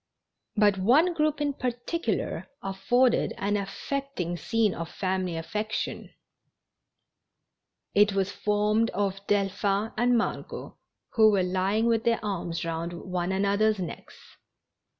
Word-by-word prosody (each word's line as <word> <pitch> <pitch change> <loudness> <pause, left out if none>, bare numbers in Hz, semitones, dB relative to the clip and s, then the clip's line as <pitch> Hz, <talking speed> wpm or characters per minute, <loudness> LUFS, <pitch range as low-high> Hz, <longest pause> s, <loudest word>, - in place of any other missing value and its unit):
But 205 -2 +4
one 290 - +4
group 305 -2 +1
in 290 -1 0
particular 255 +7 -2 0.2
afforded 240 +6 +2
an 205 +1 0
affecting 205 -1 -3
scene 220 +2 +1
of 165 0 -5
family 185 -3 -2
affection. 210 +6 -3 1.8
It 205 0 +5
was 195 0 0
formed 210 +2 +1
of 195 -1 -1
Delphin 200 +1 +1
and 240 +1 +3
Mar 230 - 0
got, - - -9 0.4
who 220 -2 +6
were 200 -3 +3
lying 190 +4 +1
with 230 -1 +2
their 230 -1 +2
arms 175 -4 -3
round 165 +1 -3
one 180 +1 -3
another's 200 +2 +2
necks. 180 -3 -7
205 Hz, 120 wpm, -27 LUFS, 190-230 Hz, 1.8 s, who